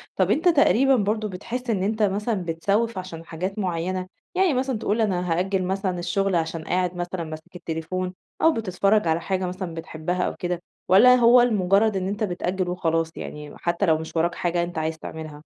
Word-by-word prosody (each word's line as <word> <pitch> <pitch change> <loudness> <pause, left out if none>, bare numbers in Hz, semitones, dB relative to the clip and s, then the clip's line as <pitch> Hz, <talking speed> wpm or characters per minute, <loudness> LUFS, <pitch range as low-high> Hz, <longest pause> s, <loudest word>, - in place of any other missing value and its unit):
طب - - +2
أنت 340 +4 +3
تقريبًا 270 -4 +4
برضه 215 0 0
بتحس 235 +7 -5
إن 195 -4 +1
أنت 215 +1 0
مثلًا 205 -1 0
بتسوّف 200 +7 0
عشان 165 -3 -7
حاجات 185 +5 -4
معيّنة؟ 185 0 -2 0.3
يعني 370 -5 +3
مثلًا 260 -2 0
تقول 220 +2 0
أنا 180 -4 0
هأجل 185 +2 0
مثلًا 190 -1 -1
الشغل 190 +2 0
عشان 165 -1 -1
قاعد 180 0 0
مثلًا 175 0 -3
ماسك 155 +2 -9
التليفون 180 +2 -4 0.3
أو 325 0 +5
بتتفرج 200 -2 +1
على 160 +1 +1
حاجة 190 0 -1
مثلًا 180 -2 -5
بتحبها 165 +2 -3
أو - - -2
كده، 175 -1 -3 0.3
والّا 250 +7 +8
هو 240 0 +6
لمجرد 205 -2 +3
إن 185 0 -2
أنت 205 +2 -2
بتأجل 180 -1 -1
وخلاص 165 -2 0
يعني، 150 0 -7
م - - -13
حتى 175 +3 0
لو 160 -2 +4
مش 160 +1 -8
وراك 170 +1 +1
حاجة 175 0 0
أنت 175 -1 -6
عايز 160 0 -1
تعملها؟ 155 -2 -7
185 Hz, 190 wpm, -24 LUFS, 170-210 Hz, 0.3 s, والّا